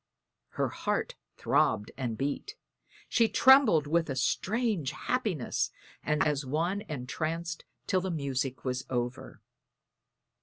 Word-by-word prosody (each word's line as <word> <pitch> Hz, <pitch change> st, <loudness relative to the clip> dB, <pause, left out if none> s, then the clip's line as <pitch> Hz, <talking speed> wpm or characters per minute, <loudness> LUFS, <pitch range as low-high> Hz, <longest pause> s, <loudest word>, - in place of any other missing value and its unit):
_" -, -, -25 dB
Her -, -, +1 dB
heart -, -, -2 dB, 0.2 s
throbbed 105 Hz, -, +2 dB
and 120 Hz, -4 st, -3 dB
beat; 145 Hz, -, -3 dB, 0.5 s
she 230 Hz, -2 st, +3 dB
trembled 260 Hz, -, +6 dB
with 165 Hz, +2 st, +1 dB
a 135 Hz, -, -2 dB
strange 195 Hz, -, 0 dB
happiness 200 Hz, -, -1 dB, 0.3 s
and 150 Hz, -1 st, +1 dB
sat -, -, +2 dB
as 145 Hz, -1 st, 0 dB
one 165 Hz, +9 st, -1 dB
entranced 160 Hz, +5 st, -3 dB, 0.2 s
till 185 Hz, -, +1 dB
the 190 Hz, -, -3 dB
music 135 Hz, -5 st, -2 dB
was 130 Hz, 0 st, -1 dB
over. 125 Hz, 0 st, -4 dB
155 Hz, 125 wpm, -30 LUFS, 130-185 Hz, 0.5 s, trembled